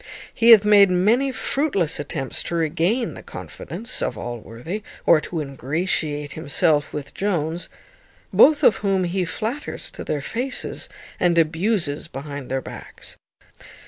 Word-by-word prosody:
He 230 - +3
hath 215 -3 +9
made 205 -2 +7
many 220 +10 +3
fruitless 260 - 0
attempts 145 -2 -3
to 170 - -4
regain 170 - 0
the - - -10
confidence 235 +3 -6
of - - -2
Allworthy, 120 - -6 0.2
or 160 -2 +6
to 165 - -4
ingratiate 145 +1 -2
himself 150 -1 +1
with 145 -2 -6
Jones, 170 -4 -2 0.6
both 300 -1 +6
of 210 - +6
whom 195 -2 +1
he 180 +1 -1
flatters 225 - -4
to - - -7
their 145 - -2
faces, 250 - -3 0.3
and 175 -1 +2
abuses 165 -1 +1
behind 140 -2 -7
their 130 0 -1
backs. - - -9
170 Hz, 135 wpm, -22 LUFS, 145-210 Hz, 0.6 s, hath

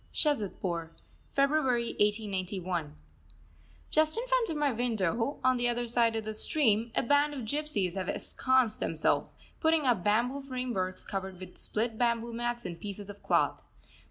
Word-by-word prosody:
SHAZADPUR, 185 - -1 0.4
February 275 -4 +2
1891. 185 -6 -1 1.0
Just 310 +4 +4
in 470 - -1
front - - +2
of 320 - -2
my 295 -2 +2
window, 230 - 0
on 255 0 +4
the 240 0 +1
other 240 0 -1
side 235 -1 +2
of 220 -1 -2
the 215 - -3
stream, 225 -2 +1
a - - +2
band 285 +3 +3
of 265 - -4
gypsies 225 - -1
have 190 -1 -3
ensconced 255 -4 +1
themselves, - - 0 0.2
putting 320 -2 +3
up 235 -8 +2
bamboo 240 +6 +1
frameworks 250 -9 -3
covered 190 -1 -4
over 185 +1 -8
with 180 - -16
split 220 +1 -2
bamboo 235 -1 +1
mats 240 0 -2
and 170 -1 -5
pieces 205 0 -6
of 205 - -15
cloth. - - +1
235 Hz, 155 wpm, -30 LUFS, 200-265 Hz, 1.0 s, Just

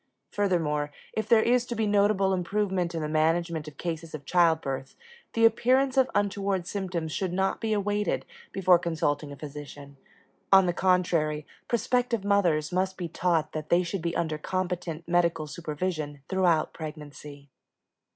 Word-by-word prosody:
Furthermore, 160 -7 0 0.2
if 220 -1 -3
there 220 -2 +6
is 245 0 +3
to 240 - -3
be 220 -1 0
notable 200 -1 +3
improvement 185 -1 -1
in 160 - -2
the - - -1
management 160 +1 0
of 145 -2 -10
cases 165 -2 -4
of 145 -2 -9
childbirth, 160 -6 +1 0.4
the 230 0 +4
appearance 255 +4 +3
of 265 -1 +4
untoward 200 -2 0
symptoms 180 -5 -3
should 185 +3 -2
not 190 +2 0
be 225 -1 -1
awaited 205 0 0 0.3
before 185 -2 +4
consulting 150 -3 -1
a - - -7
physician; 145 -1 -9 0.5
on 190 -1 +7
the 175 - +1
contrary, 170 -5 +1 0.2
prospective 240 -2 0
mothers 175 -7 +2
must 185 +1 0
be 175 - -3
taught 165 -2 0
that 155 -1 -5
they 175 +1 +4
should 175 +1 -3
be 170 0 -2
under 160 -2 -1
competent 180 -2 -3
medical 170 -2 +1
supervision 150 -1 -4
throughout 180 -4 +2
pregnancy. 145 -2 -9
175 Hz, 150 wpm, -27 LUFS, 155-195 Hz, 0.5 s, on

